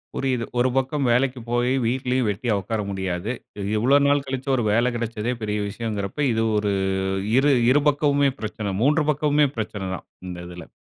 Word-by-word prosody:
புரிது. 130 -3 -1
ஒரு 125 +1 +3
பக்கம் 135 +1 0
வேலைக்கு 125 +1 +1
போய் 120 +1 +1
வீட்லேயும் 125 0 0
வெட்டியா 110 +3 -1
உட்கார 110 +4 -3
முடியாது. 95 +2 -3 0.5
இவ்வளவு 135 +6 +4
நாள் 145 0 +3
கழிச்சு 135 +1 -4
ஒரு 120 - 0
வேலை 120 +4 +2
கெடைச்சதே 115 0 -2
பெரிய 105 -1 -1
விஷயம்ங்கிறப்ப 105 +3 -3
இது 115 0 +1
ஒரு 105 -1 0 0.7
இரு 140 +2 +4 0.2
இரு 145 +3 +4
பக்கமுமே 145 -1 +2
பிரச்சனை, 105 -2 -4
3 150 +3 +3
பக்கமுமே 150 0 +2
பிரச்சனை 105 -3 -4
தான் - - -11 0.2
இந்த 90 -1 -6
இதில. 90 -1 -10
120 Hz, 160 wpm, -23 LUFS, 105-135 Hz, 0.7 s, இவ்வளவு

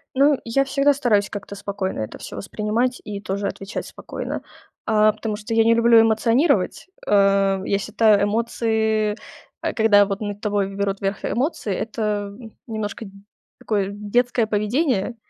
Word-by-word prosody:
Ну, 280 +1 +4
я 255 +4 +1
всегда 280 +1 +3
стараюсь 220 -7 +1
как-то 200 0 -7
спокойно 195 - -4
это 110 - -5
всё - - -9
воспринимать 220 +5 -1
и 205 -2 -6
тоже 200 +1 -3
отвечать 195 +2 -5
спокойно. - - -6 0.4
А, 215 -1 +4
потому 215 0 -4
что 220 +2 -5
я 225 0 +4
не 230 +1 +4
люблю 230 -1 +6
эмоционировать. 230 - +2 0.2
Э, 195 -1 +3
я 200 - +1
считаю 215 -1 +3
эмоции 220 -1 0 0.5
э, - - -2
когда 210 -3 +5
вот 195 +1 -4
над 205 -1 -5
тобой 205 -2 -1
берут 200 0 -2
верх 195 0 -2
эмоции- 245 - -1
это 210 -2 -3 0.3
немножко 215 0 -4
д 195 - -11 0.5
такое 200 -3 -1
детское 225 +3 0
поведение. 225 - 0
210 Hz, 150 wpm, -22 LUFS, 200-230 Hz, 0.5 s, люблю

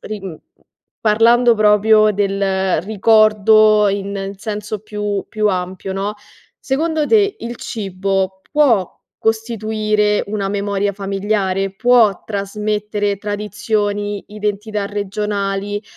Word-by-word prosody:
ri 215 -1 -6
mhmm, 180 -5 -7 0.6
parlando 230 +2 +4
proprio 215 0 +4
del 195 -3 0
ricordo 215 0 +4
in 200 0 -3
in 195 0 -5
senso 210 0 -5
più 210 -1 -3
più 215 -1 -1
ampio, 185 0 -3
no, 195 +2 -3 0.4
secondo 310 +2 -1
te, 415 -2 +3
il 235 +1 -6
cibo 195 -2 -3
può 250 - +2 0.2
costituire 215 -2 0
una 200 -1 -2
memoria 200 0 -1
familiare? 195 -1 -2
Può 230 -5 +3
trasmettere 210 0 -2
tradizioni, 205 0 -2
identità 210 0 -3
regionali 205 0 -3
205 Hz, 100 wpm, -18 LUFS, 195-215 Hz, 0.6 s, parlando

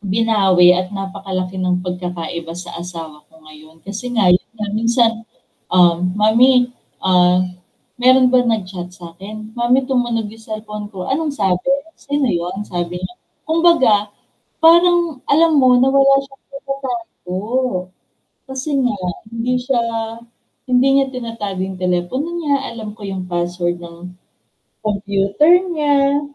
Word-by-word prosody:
binawi 195 -3 +4
at 185 +1 -1
napakalaki 190 -1 -4
ng 180 -1 +1
pagkakaiba 175 -2 -5
sa 180 -1 -8
asawa 165 -4 -8
ko 160 - -20
ngayon, 155 +1 -16
kasi 215 +5 -5
nga 210 -4 +3
'yun 180 - +1
nga 215 - -3
minsan, 230 +1 +3 0.6
ah, 175 -2 +5
"Mommy, 230 +7 +3 0.3
ah, 180 -1 +4 0.6
meron 255 +1 +5
ba 250 0 +4
nag-chat 185 -5 -3
sa'kin?" 195 +6 -10
"Mommy 250 +2 +2
tumunog 240 -4 0
yung 225 +1 -14
cellphone 215 -1 -6
ko, 185 +3 -6
anong 300 +2 -1
sabi? 185 -8 0 0.3
Sino 285 -2 -1
yun?" 175 +1 -2
sabi 175 0 -4
niya. 185 +6 -6 0.3
Kumbaga 315 -11 +3 0.5
parang 340 -3 +4
alam 320 +1 +4
mo 255 -1 +5
na 260 - +4
wala 275 0 +5
siyang 270 0 -18
tinatago, 250 -9 -5 1.0
kasi 265 +2 -5 0.2
nga 230 - -1 0.3
hindi 235 +2 -1
siya 250 -1 0 0.9
hindi 250 +2 +4
niya 270 - +2
tinatago 230 -6 -5
yung 190 -1 -5
telepono 180 - -1
niya, 285 -4 -1
alam 215 -2 -7
ko 215 - -15
yung 190 -2 -5
password 175 0 -2
ng 170 +1 -10 0.7
computer 200 +6 +1 0.2
niya. 285 -2 +2
215 Hz, 130 wpm, -18 LUFS, 180-255 Hz, 1.0 s, ah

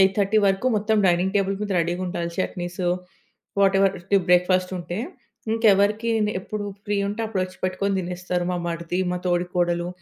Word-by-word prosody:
8:30 195 +2 +3
వరకు 195 +6 +1
మొత్తం 215 +1 +1
dining 180 +2 +2
table 195 0 +1
మీద 210 -1 -3
రెడీగుండాలి 175 0 -2
చట్నీ‌‌స్ 180 0 -3 0.8
వాటెవర్ 195 0 +4 0.3
బ్రేక్‌ఫాస్ట్ 180 +1 +3
ఉంటే. 175 +2 -5 0.5
ఇంకెవరికి 215 +1 +3 0.3
ఎప్పుడు 210 +2 -5 0.2
ఫ్రీ 205 -1 -1
ఉంటే 210 +3 -4
అప్పుడొచ్చి 185 -3 -3
పెట్టుకొని 195 +2 0
తినేస్తారు. 180 0 -3
మా - - -1
మరిది, 170 +1 -3
మా 180 - -1
తోడికోడలు, 175 -1 0
185 Hz, 130 wpm, -24 LUFS, 175-200 Hz, 0.8 s, వాటెవర్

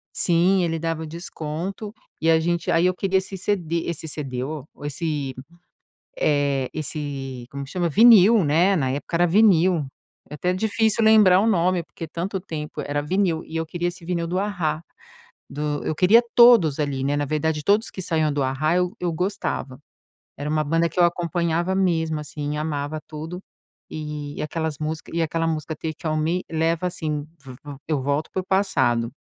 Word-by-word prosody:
Sim, 180 +2 +3
ele 165 -1 -1
dava 165 -1 -3
desconto 170 +5 -6 0.3
e 165 +1 +3
a 160 0 +4
gente 170 0 -1
aí 170 +2 +3
eu 185 - +2
queria 190 +1 +1
esse 190 +1 -5
cd 170 -4 -1
esse 160 -1 -4
cd, 135 -4 -4
oh, 150 0 -5 0.2
esse, 145 -3 -3 0.8
eh, 140 - +1
esse 140 -5 -5
como 140 0 -6
que 135 - -13
chama? 175 -2 0
Vinil, 220 +1 +7
né, 175 +7 +3
na 130 -4 0
época 145 +5 -3
era 175 +1 +4
vinil. 180 -5 +4 0.4
É 150 - -7
até 180 +4 0
difícil 220 +3 +1
lembrar 210 -4 +6
o 215 - +1
nome, 180 -4 +2
porque 165 0 -9
tanto 180 +5 -4
tempo, 150 -4 -6
era 145 +1 -2
vinil. 170 0 0
E 160 - -7
eu 160 0 -1
queria 175 +2 -2
esse 175 -1 -8
vinil 170 -1 -2
do 180 +2 -2
A-Ha, 175 -7 -1 0.7
do 150 0 -3
eu 155 - -1
queria 205 +9 +5
todos 230 - +6
ali, 140 -3 -1
né, 145 +1 0
na 145 - 0
verdade 155 +1 -1
todos 210 +3 +2
que 190 - -6
saiam 155 -3 +1
do 145 - 0
A-Ha 145 +6 0
eu 180 0 +1
eu 175 -2 -1
gostava. 160 -7 -3 0.6
Era 145 +1 -4
uma 155 0 +1
banda 165 +3 +1
que 180 - -5
eu 175 - +6
acompanhava 175 +1 0
mesmo 160 -5 +1
assim, 150 0 -5
e - - -3
amava 150 0 -3
tudo 160 +3 -7 0.5
e 150 -2 -6
e - - -3
aquelas 160 -1 -3
música 155 +1 -4
e 170 - 0
aquela 165 +1 -1
música 160 0 -3
Take 160 +1 -5
on 155 - 0
me, 165 +4 0
leva 165 +2 0
assim, 155 -4 -3 0.2
pr 130 - -10
v - - -15 0.3
eu 150 -4 0
volto 145 +3 -1
pro 185 - -2
passado, 120 -13 +1
160 Hz, 185 wpm, -23 LUFS, 150-180 Hz, 0.8 s, Vinil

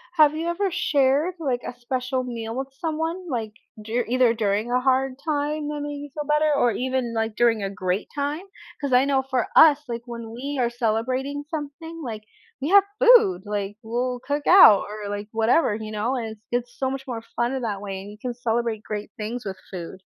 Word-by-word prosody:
Have 305 -2 +5
you 325 +2 -2
ever 380 +3 0
shared, 295 -1 +2
like, 255 -6 -1
a - - -5
special 255 +1 -2
meal 230 -2 -5
with 265 +1 -3
someone? 325 +3 -2
Like, 225 -5 -3 0.3
duri 230 +3 -1
either 250 -1 +4
during 215 +1 0
a 250 - +3
hard 265 0 +2
time 295 0 -2
that 295 -1 -4
made 290 0 -5
you 290 - -11
feel 300 -1 -4
better 300 0 +3
or 245 -4 +3
even, 255 0 -2
like, 220 -1 -1
during 225 -3 +3
a 195 - -1
great 185 +1 -2
time? 290 +5 -2 0.4
'Cause 280 -3 -1
I 255 +2 +5
know 275 -1 +2
for 260 -1 -1
us, 295 -2 +7
like, 235 0 -4
when 235 -1 -7
we 270 +4 -4
are 235 - +2
celebrating 255 +5 -1
something, 320 +2 -6
like, 220 -4 -5 0.4
we 290 - -1
have 400 +1 +7 0.2
food, 470 - +6
like, 205 0 -3
we'll 245 +2 -2
cook 290 +2 -2
out 350 - +8
or, 210 -1 -6
like, 205 0 -4
whatever, 225 +4 +3
you 215 0 -6
know, 215 +4 -1
and 235 -3 -3
it's 215 - -12
it's 245 0 -2
so 265 - +1
much 270 0 -5
more 235 -3 -4 0.2
funner 240 +3 +1
in - - -4
that 205 -3 -3
way 195 -2 -5
and 200 +1 -9
you 210 - -12
can 250 -1 -3
celebrate 235 -2 -1
great 210 -1 -5
things 225 +3 -4
with 190 -1 -5
food. 185 +1 -7
250 Hz, 210 wpm, -24 LUFS, 220-290 Hz, 0.4 s, out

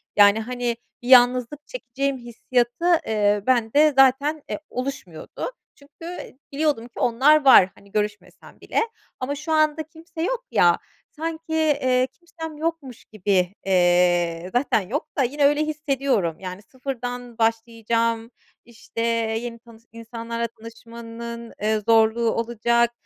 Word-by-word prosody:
Yani, 205 +1 +6
hani, 245 +1 -2 0.3
bir 240 - -9
yalnızlık 250 +3 +4
çekeceğim 275 - -3
hissiyatı, 240 +3 -2 0.2
eee, 205 -1 +2
bende 260 +5 +3
zaten, 275 +3 +4
eee, - - -3
oluşmuyordu. 255 - -6 0.2
Çünkü, 285 +3 -15
eee, 345 -7 -8
biliyordum 285 -5 0
ki 240 - -12
onlar 280 +5 +4
var, 195 -8 +8
hani, 200 0 -20
görüşmesem 210 0 -5
bile. - - -1 0.4
Ama 265 +3 -3
şu 300 +3 -6
anda 310 0 +2
kimse 320 +2 -10
yok - - -2
ya, - - +4 0.3
sanki, 325 +1 -5
eee, 280 -5 +2
kimsem 325 -3 -9
yokmuş 310 -6 -4
gibi. 195 -3 0
Eee, 175 -2 +2
zaten 245 -4 +2
yok 295 +6 -2
da 275 - +3
yine 285 +4 +1
öyle 295 +1 +3
hissediyorum, 275 - -1
yani, 185 +1 -7
sıfırdan 245 -1 -6
başlayacağım, 230 0 0 0.3
işte, 230 0 -8 0.4
yeni 235 -1 -7
tanış 230 -1 -18
insanlarla 230 +1 -5
tanışmanın, 230 +1 -10
eee, 215 +1 +1
zorluğu 225 0 +4
olacak. 235 +1 +1
240 Hz, 130 wpm, -23 LUFS, 225-285 Hz, 0.4 s, var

